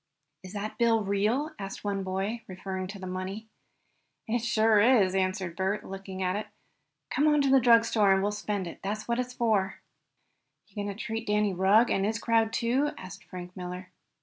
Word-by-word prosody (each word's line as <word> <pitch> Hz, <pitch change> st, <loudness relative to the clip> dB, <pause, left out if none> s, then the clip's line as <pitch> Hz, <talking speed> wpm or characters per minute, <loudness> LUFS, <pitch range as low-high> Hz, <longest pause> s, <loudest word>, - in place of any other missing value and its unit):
"Is 185 Hz, +1 st, -10 dB
that 210 Hz, +3 st, -5 dB
bill 230 Hz, -2 st, +3 dB
real?" 215 Hz, +10 st, 0 dB
asked 195 Hz, -1 st, -6 dB
one 200 Hz, -1 st, -1 dB
boy, 195 Hz, +5 st, -2 dB
referring 185 Hz, 0 st, -5 dB
to 200 Hz, +2 st, -8 dB
the 190 Hz, -, -8 dB
money. 185 Hz, +4 st, -5 dB, 0.8 s
"It 235 Hz, +2 st, +1 dB
sure 220 Hz, -2 st, +3 dB
is," 210 Hz, -4 st, +4 dB
answered 185 Hz, -2 st, -1 dB
Bert, 190 Hz, +3 st, -1 dB
looking 190 Hz, -1 st, -6 dB
at 185 Hz, +1 st, 0 dB
it. 210 Hz, -, -3 dB, 0.6 s
"Come 295 Hz, -, +2 dB
on 300 Hz, -1 st, +4 dB
to 275 Hz, -1 st, +2 dB
the 270 Hz, -, +7 dB
drugstore 230 Hz, -4 st, +4 dB
and 190 Hz, 0 st, +3 dB
well 205 Hz, -, +1 dB
spend 210 Hz, -2 st, -3 dB
it. 170 Hz, -, -8 dB
That's 210 Hz, +2 st, -4 dB
what 235 Hz, +1 st, 0 dB
it's 250 Hz, 0 st, -3 dB
for." 210 Hz, -5 st, 0 dB, 0.9 s
"Going 205 Hz, -1 st, -4 dB
to 200 Hz, -, -4 dB
treat 225 Hz, +1 st, -4 dB
Danny 210 Hz, -1 st, +2 dB
Rugg, 195 Hz, +6 st, +4 dB
and 195 Hz, -, +1 dB
his 215 Hz, +2 st, 0 dB
crowd, 230 Hz, -1 st, +2 dB
too?" 245 Hz, +6 st, +1 dB
asked 185 Hz, -, -10 dB
Frank 180 Hz, -1 st, -9 dB
Miller. 180 Hz, 0 st, -7 dB
205 Hz, 185 wpm, -28 LUFS, 190-230 Hz, 0.9 s, the